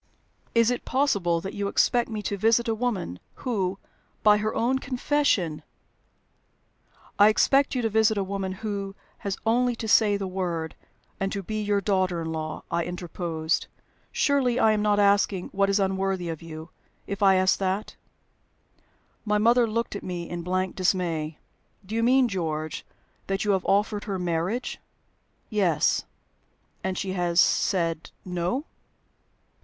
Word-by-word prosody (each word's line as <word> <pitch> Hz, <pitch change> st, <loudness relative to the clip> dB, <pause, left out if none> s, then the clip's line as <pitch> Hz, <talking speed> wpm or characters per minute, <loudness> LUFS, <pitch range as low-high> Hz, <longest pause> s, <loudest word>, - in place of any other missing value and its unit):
"Is 230 Hz, +1 st, +5 dB
it 245 Hz, -, -2 dB
possible 200 Hz, -12 st, +1 dB
that 195 Hz, -, -6 dB
you 200 Hz, 0 st, -2 dB
expect 240 Hz, +4 st, +2 dB
me 215 Hz, -2 st, -4 dB
to 205 Hz, -, -2 dB
visit 225 Hz, +4 st, +2 dB
a 225 Hz, -, +1 dB
woman, 215 Hz, -, -2 dB, 0.3 s
who, 195 Hz, -6 st, 0 dB, 0.5 s
by 210 Hz, -1 st, +6 dB
her 215 Hz, +1 st, -2 dB
own 255 Hz, +3 st, +1 dB
confession 255 Hz, -, 0 dB, 0.8 s
" -, -, -32 dB
"I 205 Hz, -, +8 dB
expect 275 Hz, +6 st, +3 dB
you 250 Hz, -, 0 dB
to 225 Hz, -, +1 dB
visit 220 Hz, 0 st, +3 dB
a 200 Hz, -, +1 dB
woman 195 Hz, 0 st, -3 dB
who 200 Hz, -2 st, -3 dB, 0.2 s
has 200 Hz, -2 st, -3 dB
only 245 Hz, +2 st, +2 dB
to 225 Hz, -, -5 dB
say 210 Hz, -2 st, +4 dB
the 200 Hz, -, -3 dB
word 175 Hz, -4 st, -3 dB, 0.5 s
and 195 Hz, -1 st, -1 dB
to 200 Hz, -, -3 dB
be 215 Hz, +3 st, -3 dB
your 205 Hz, -1 st, +1 dB
daughter 185 Hz, -4 st, 0 dB
in 160 Hz, -, -4 dB
law," 155 Hz, -1 st, -4 dB
I 170 Hz, 0 st, +1 dB
interposed. 170 Hz, -2 st, -2 dB, 0.4 s
"Surely 265 Hz, -4 st, +2 dB
I 220 Hz, -3 st, +5 dB
am 215 Hz, -1 st, +1 dB
not 210 Hz, -1 st, +2 dB
asking 200 Hz, -2 st, +2 dB
what 195 Hz, 0 st, +1 dB
is 200 Hz, +1 st, +2 dB
unworthy 190 Hz, -2 st, 0 dB
of 160 Hz, -2 st, -5 dB
you, 160 Hz, -1 st, -9 dB, 0.3 s
if 200 Hz, 0 st, -5 dB
I 195 Hz, -1 st, +6 dB
ask 185 Hz, 0 st, +3 dB
that?" 195 Hz, +2 st, -2 dB, 1.3 s
My 210 Hz, -1 st, +1 dB
mother 235 Hz, +3 st, +4 dB
looked 230 Hz, 0 st, -2 dB
at -, -, -4 dB
me 175 Hz, -2 st, -5 dB
in 175 Hz, 0 st, -5 dB
blank 185 Hz, +1 st, -1 dB
dismay. 170 Hz, -5 st, 0 dB, 0.5 s
"Do 205 Hz, -, -8 dB
you 230 Hz, -, +1 dB
mean, 255 Hz, +2 st, +4 dB
George, 160 Hz, -6 st, -3 dB, 0.4 s
that 195 Hz, +1 st, -1 dB
you 205 Hz, -, +3 dB
have 190 Hz, -2 st, 0 dB
offered 205 Hz, +1 st, +1 dB
her 200 Hz, -3 st, -2 dB
marriage?" 180 Hz, +7 st, -2 dB, 0.7 s
"Yes." 180 Hz, -8 st, +2 dB, 0.8 s
"And 190 Hz, -1 st, -2 dB
she 190 Hz, -1 st, -2 dB
has 175 Hz, -2 st, +1 dB
said 165 Hz, -3 st, +2 dB, 0.2 s
No?" 180 Hz, -, -2 dB
195 Hz, 160 wpm, -26 LUFS, 180-220 Hz, 1.3 s, I